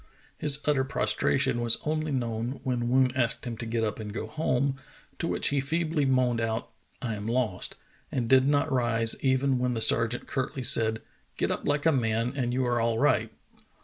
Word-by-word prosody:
His 145 -1 +2
utter 145 -3 +2
prostration 125 -2 +1
was 115 -1 +4
only 155 0 -1
known 120 0 -2
when 125 -3 -1
Woon 130 0 +3
asked 120 -3 +1
him 120 -2 -4
to 115 - -6
get 115 0 -1
up 110 0 -2
and 105 -1 -6
go 105 - -4
home, 140 -3 -1 0.4
to 165 - -1
which - - +2
he 140 - +1
feebly 155 +1 0
moaned 125 -3 +2
out, 115 +1 -2 0.3
"I 115 -3 -2
am 105 0 -5
lost," 115 -6 -1 0.4
and 120 -3 -1
did 130 +2 +5
not 145 0 +2
rise 115 -3 +1
even 130 0 +2
when 125 -1 0
the - - -1
sergeant 115 +2 +2
curtly 130 -1 -3
said: 110 -2 +2 0.3
"Get - - 0
up - - -3
like 145 +1 0
a 165 - +5
man 115 -2 0
and 125 -3 -1
you 130 +1 0
are 120 -1 +1
all 115 0 +1
right." - - +2
125 Hz, 195 wpm, -27 LUFS, 115-135 Hz, 0.4 s, did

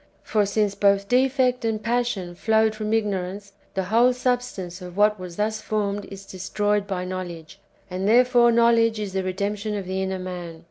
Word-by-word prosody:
For 210 -2 +1
since 205 0 +1
both 200 0 +2
defect 255 0 +2
and 225 -1 0
passion 230 -6 -1
flowed 220 +4 +2
from 215 0 -4
ignorance, 200 -2 -2 0.2
the 190 - 0
whole 230 +6 +4
substance 245 -8 -2
of 180 0 -9
what 210 0 +3
was 180 -2 -8
thus 215 +2 -1
formed 205 -2 -2
is 195 0 -10
destroyed 205 +2 -1
by 185 -2 -3
knowledge; 175 -4 -7 0.3
and 185 +1 -3
therefore 240 +1 +5
knowledge 230 -1 +3
is 205 -3 -4
the 190 - 0
redemption 200 +3 -2
of 195 - -5
the 190 +1 -2
inner 190 0 -2
man. 180 -3 -7
205 Hz, 175 wpm, -24 LUFS, 185-225 Hz, 0.3 s, therefore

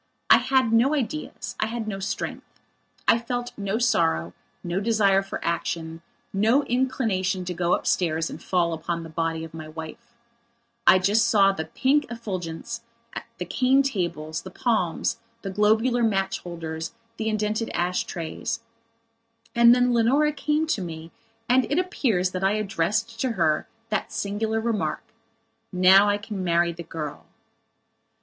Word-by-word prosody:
I - - +10
had 260 -4 +2
no 255 +6 +4
ideas; 295 +3 -4
I 215 - +1
had 225 -1 -4
no 195 -2 -3
strength. 195 - -5 0.5
I 230 - +5
felt 245 +1 -3
no 200 +1 -2
sorrow, 85 - +1 0.3
no 175 +2 -1
desire 200 -2 +3
for 195 - -6
action, 165 -1 -2 0.3
no 225 +8 +3
inclination 220 -8 0
to 180 - -3
go 175 0 +2
upstairs 165 -2 0
and - - -8
fall 175 -2 +1
upon 170 +1 -3
the 165 - -9
body 165 0 -2
of 160 - -9
my 160 -1 -7
wife. 160 +10 -9 0.7
I - - +9
just 210 +5 +3
saw 200 -4 +5
the 160 -5 -4
pink 285 +3 +1
effulgence, 210 -1 -5 0.6
the 180 - -4
cane 260 +5 +3
tables, 170 - -2
the - - -9
palms, 215 -9 0 0.2
the 195 - -4
globular 220 +5 +2
match 195 -4 +1
holders, 165 -2 -6 0.2
the 220 0 -1
indented 215 +1 -1
ash 180 +1 -1
trays. 175 +7 -4 0.9
And 235 0 +7
then 250 0 +3
Leonora 270 +6 +3
came 300 +2 0
to 310 -10 -1
me 165 -2 -7 0.4
and 255 +2 +3
it 290 - +2
appears 230 - +1
that 185 0 -4
I 195 +1 +3
addressed 215 +3 -1
to 255 -3 0
her 155 -6 +1 0.2
that 215 - -2
singular 220 +2 -1
remark: 215 -9 -1 0.7
"Now 190 +2 +6
I 205 - +2
can 205 -2 -5
marry 170 -1 +2
the 170 +1 -8
girl." 160 -3 -7
200 Hz, 150 wpm, -25 LUFS, 170-235 Hz, 0.9 s, I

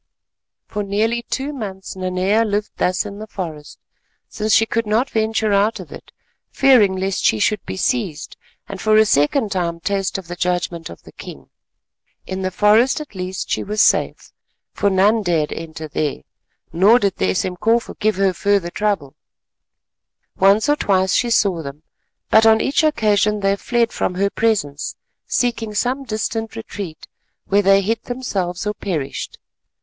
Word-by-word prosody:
For 210 - -4
nearly 215 +4 0
two 280 +3 -3
months 195 -8 -7
Nanea 185 +4 +1
lived 210 -1 -2
thus 180 +3 0
in 205 0 -8
the 215 - -7
forest, 160 -8 -7 0.5
since 215 0 -3
she 225 +2 +5
could 230 0 -2
not 225 +5 +1
venture 220 -1 0
out 205 +3 +2
of - - -10
it—fearing 240 -8 +1
lest 190 0 -2
she 110 - +3
should 210 - 0
be - - -5
seized, 190 - -2 0.3
and 195 -1 -7
for 215 0 +3
a 220 - +6
second 205 - +2
time 170 -3 -2
taste 195 +2 -1
of 190 -3 -9
the 175 - -6
judgment 175 -2 -2
of 85 - -12
the - - -14
king. 70 -1 -11 0.7
In 190 0 -5
the 185 - -1
forest 215 - +3
at 300 -6 -9
least 185 0 -5
she - - 0
was 210 +1 -4
safe, - - +2 0.4
for 200 - +1
none 200 +4 +3
dared 165 -6 0
enter 160 -1 -7
there, 150 -1 -3 0.5
nor 200 +8 +5
did 200 -5 0
the 95 - +1
Esemkofu 200 - 0
give 215 0 +1
her 195 -1 +2
further 200 -1 0
trouble. 195 -11 -1 1.2
Once 200 +6 +4
or 295 - +4
twice 190 -5 +1
she 240 - +2
saw 195 -7 +2
them, 145 +1 -9 0.5
but 220 - +6
on 220 0 +6
each 275 +6 +1
occasion 210 -7 +2
they 195 0 +2
fled 235 +2 0
from 180 - -2
her 200 +2 0
presence—seeking 220 - -2
some 255 +5 -1
distant 225 0 -3
retreat, 200 -7 -7 0.4
where 200 +1 +3
they 195 0 +4
hid 225 +4 -1
themselves 200 -8 -3
or 210 - -1
perished. 155 -10 -4
200 Hz, 160 wpm, -20 LUFS, 180-220 Hz, 1.2 s, a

